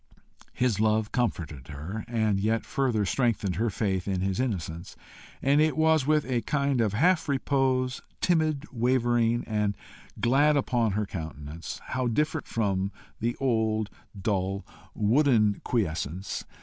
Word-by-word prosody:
His 125 -5 +1
love 110 0 +2
comforted 85 - -2
her, 80 +9 -6
and 110 -4 +1
yet 110 +3 0
further 120 -7 0
strengthened 105 -5 0
her 115 +2 +1
faith 95 -2 -1
in 95 -2 0
his 95 0 -1
innocence; 90 -8 -3 0.5
and 140 +2 +4
it 155 0 +2
was 160 -3 +3
with 155 -1 +3
a 125 -2 0
kind 140 -3 +1
of 105 -3 +1
half 165 - +3
repose, 130 -2 +1 0.2
timid, 155 -4 +1
wavering, 120 -1 +2
and 105 -2 -1 0.4
glad, 145 +5 +4
upon 120 -6 +1
her 105 +1 0
countenance 80 -3 -7
how 130 -1 0
different 150 +6 0
from 100 -3 0 0.3
the 120 +1 -1
old, 110 -5 +1 0.3
dull, 95 -1 -1 0.3
wooden 110 -2 +3
quiescence! 90 - -2
115 Hz, 135 wpm, -27 LUFS, 100-130 Hz, 0.5 s, and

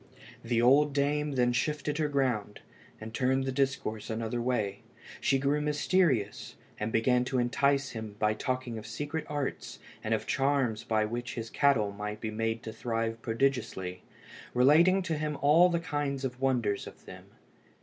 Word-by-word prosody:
The 115 0 +1
old 140 +4 +5
dame 145 +1 0
then 125 -2 +2
shifted 150 +3 -1
her 155 - +2
ground, 130 -8 -1 0.4
and 110 +1 -8
turned 130 +2 +1
the 135 - -2
discourse 130 -5 -1
another 115 +1 -2
way. 110 -5 -1 0.4
She 135 - +2
grew 140 +2 +1
mysterious, 150 - +1 0.2
and 105 +1 -2
began 125 +2 +3
to 130 - -1
entice 135 +3 +1
him 110 -3 -7
by 105 0 +2
talking 125 0 -3
of 110 - -10
secret 145 +8 -4
arts 145 -2 -4 0.3
and - - +1
of - - -4
charms 135 -5 +1
by 110 -2 +1
which 120 +2 -4
his 115 -1 -5
cattle 115 -8 +3
might 105 +1 -5
be 110 0 -4
made 115 +1 -2
to 110 - -6
thrive 115 0 -2
prodigiously, 115 -7 -1 0.5
relating 165 +9 +5
to 165 -3 -1
him 150 -1 -2
all 160 +6 +5
kinds 145 -5 -2
of 125 0 -5
wonders 120 -7 0
of - - -13
them. - - -11
125 Hz, 160 wpm, -30 LUFS, 115-145 Hz, 0.5 s, old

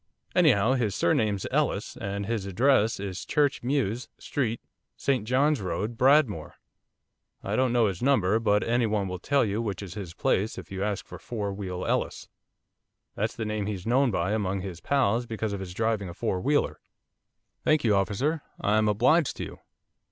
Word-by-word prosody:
Anyhow 100 +5 +4
his 115 -6 0
surname's 110 - +1
Ellis - - 0
and 100 +1 -4
his 110 -2 -2
address 115 +2 +3
is 95 -1 -5
Church 145 -2 +1
Mews, 125 -3 -1
St 120 -1 -3
John's 140 +2 +2
Road, 100 +5 -3
Bradmore, 125 - +3 0.9
I - - -2
don't 130 -1 +2
know 120 -2 +3
his 95 -4 -2
number, 110 -6 +3
but 105 -2 +2
any 120 0 +1
one 105 -2 0
will 90 -1 -5
tell 140 +6 +2
you 105 +2 -1
which 105 -3 -3
is 90 -4 -7
his 90 -4 -7
place, 105 +3 0
if - - -9
you 95 0 -3
ask 105 -2 -2
for - - -10
Four 105 -4 -4
Wheel 95 -2 -5
Ellis, - - -1 0.9
that's - - -2
the 110 - -3
name 105 -1 -2
he's 95 -4 -4
known 130 +3 +3
by 95 -2 0
among 100 -3 -1
his 90 -3 -7
pals 120 -2 +1
because 110 -2 -3
of 100 - -3
his 95 -2 -6
driving 110 -1 -1
a 85 - -9
four 95 -1 -1
wheeler.' 145 +5 +1 0.8
'Thank 155 -1 +3
you, 110 -4 +3
officer. 130 +11 0 0.2
I 105 +1 +2
am 110 - +2
obliged 125 +10 +3
to - - -3
you. - - -8
110 Hz, 180 wpm, -27 LUFS, 100-125 Hz, 0.9 s, Anyhow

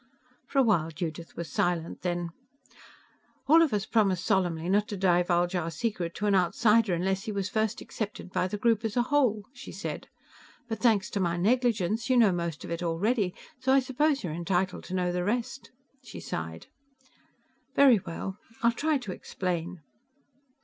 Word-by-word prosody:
For - - -5
a 270 - +6
while 175 -9 +2
Judith 165 +1 -6
was 170 - -4
silent. 170 -2 -1
Then, 175 -1 -2 1.1
"All 320 +3 +6
of 320 -5 +3
us 210 -1 0
promised 195 -6 +1
solemnly 175 -3 +1
not 205 +3 +2
to 205 - -5
divulge 175 -1 +2
our 175 -3 -1
secret 170 0 -3
to 210 - -3
an 205 - +3
outsider 210 +2 +3
unless 190 +4 -1
he 220 - -3
was 200 -2 -2
first 220 0 -1
accepted 210 -4 -6
by 185 - 0
the 210 - -4
group 225 0 +2
as 225 +1 -2
a 240 - +4
whole," 250 -6 +2
she 265 0 -10
said. - - -6 0.6
"But 225 -1 -4
thanks 220 -3 +2
to 205 - -2
my 175 -2 0
negligence, 225 +1 +1
you 255 - +4
know 225 -5 +6
most 170 -3 -3
of - - -7
it 170 - -3
already, 180 +4 0 0.2
so 260 +1 +2
I 275 - +6
suppose 275 +3 0
you're 165 -4 -3
entitled 180 +2 -1
to 185 - -5
know 180 -1 0
the 180 0 -1
rest." 240 +6 -2 0.3
She 240 - -10
sighed. 80 0 -5 1.1
"Very 265 -6 +6
well 190 +2 -6 0.2
I'll 235 - +5
try 300 +5 +1
to 245 -8 -6
explain...." 180 -2 -4
195 Hz, 175 wpm, -28 LUFS, 175-230 Hz, 1.1 s, a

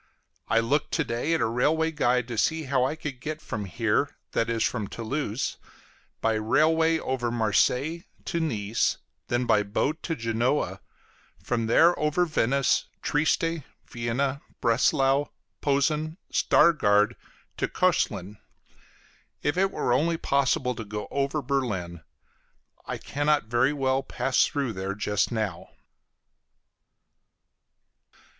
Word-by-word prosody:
I 115 - +3
looked 140 +6 0
to 160 - +2
day 135 +7 -1
at - - -1
a - - +3
railway 155 +8 +1
guide 125 -5 +1
to 120 - -3
see 160 +5 +1
how 135 -2 +1
I 135 +4 0
could 145 -5 -7
get 155 +3 -4
from 105 -9 -5
here 115 +7 0
that 115 - 0
is, 115 -1 0
from 110 -5 -1
Toulouse 120 +1 -3 0.6
by 115 - +2
railway 160 +9 +3
over 130 -5 -2
Marseilles 125 - +1 0.2
to 170 - -1
Nice, 115 -8 0 0.3
then 120 +1 0
by 105 -3 +4
boat 125 +10 -1
to 165 - -2
Genoa; 115 +4 -1 0.6
from 115 -2 -2
there 165 +9 +6
over 150 +4 +2
Venice, 140 -4 +1 0.2
Trieste, 160 +2 +1 0.2
Vienna, 130 +4 -2 0.2
Breslau, 135 +4 +2 0.3
Posen, 150 +3 +1 0.2
Stargard 105 -10 +4 0.4
to - - 0
Cöslin! 100 +4 0 1.0
If 145 - +1
it 195 +2 +2
were 125 - 0
only 165 +6 +2
possible 135 -4 +1
to 115 - -6
go 105 0 -6
over 140 +1 -1
Berlin! 95 - -2 0.9
I - - -3
cannot 145 +1 0
very 120 +5 +2
well 135 -2 +1
pass 130 0 +1
through 140 -7 -2
there 95 0 -4
just 105 +1 0
now. 110 -7 -3
130 Hz, 125 wpm, -26 LUFS, 115-150 Hz, 1.0 s, there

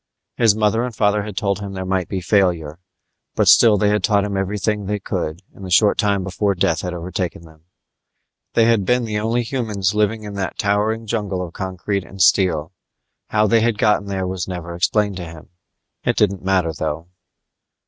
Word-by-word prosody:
His 115 -4 +4
mother 110 +2 +1
and 125 -2 -4
father 105 -1 +2
had 105 -2 -7
told 100 -2 0
him 100 -1 -6
there 95 -1 -5
might 95 -1 -1
be 95 -2 -3
failure, 85 -5 +1 0.6
but - - +2
still 110 -3 +7
they 105 0 +2
had 105 -2 +1
taught 100 -1 +3
him 100 -1 -3
everything 100 +1 -1
they 105 +1 -1
could 85 -2 -4
in - - -15
the 95 - -7
short 100 +4 +4
time 100 -3 +1
before 100 +1 -1
death 85 -3 +1
had 90 -1 -4
overtaken 85 0 -4
them. 80 -1 -18 0.9
They 115 - +5
had 115 -3 +3
been 125 +4 +1
the 105 -1 -2
only 115 +3 0
humans 110 -6 -1
living 105 +1 0
in 105 -1 -7
that 100 -2 -4
towering 105 +2 0
jungle 100 -5 -2
of 85 - -12
concrete 95 +1 -3
and 95 - -13
steel. 85 -4 +3 0.6
How 105 0 +2
they 115 +2 +3
had 115 -1 +1
gotten 105 -2 +2
there 95 -1 -2
was 90 -2 -3
never 90 -2 -6
explained 100 +3 0
to 90 - -5
him. 80 -1 -13 0.5
It - - +1
didn't 100 -3 +1
matter, 95 -4 +1
though. 80 +2 -4
100 Hz, 195 wpm, -20 LUFS, 90-105 Hz, 0.9 s, still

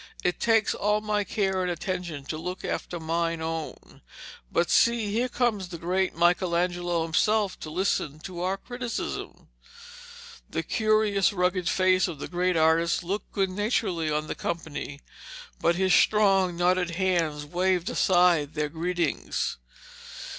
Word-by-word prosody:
It 180 - 0
takes 225 -2 +3
all 210 +1 +1
my 210 -1 0
care 190 -2 -1
and 180 - -1
attention 175 -4 -4
to 155 - -4
look 180 +3 -5
after 175 - -3
mine 165 +1 -1
own. 160 -1 -6 0.5
But 170 - +1
see, 230 -3 +3
here 245 +3 0
comes 225 -7 0
the 175 -1 -7
great 185 +3 -1
Michelangelo 175 0 +1
himself 205 +5 +1
to 155 - -7
listen 155 -3 -1
to 175 0 -7
our 185 +2 0
criticism.' 245 +2 -5 1.0
The - - -2
curious, 215 -3 +2
rugged 180 -1 0
face 185 0 +3
of 170 -4 -6
the - - -6
great 180 0 0
artist 165 +2 +3
looked 195 +5 -4
good 195 -2 0
naturedly 190 -5 0
on 150 0 -1
the - - -4
company, 155 -4 -5 0.6
but 170 - +2
his 190 0 +2
strong 195 -4 +4
knotted 180 -1 +1
hands 170 -5 0
waved 180 +3 0
aside 175 -6 +3
their 150 -1 -1
greetings. 170 0 -2
180 Hz, 140 wpm, -26 LUFS, 165-195 Hz, 1.0 s, strong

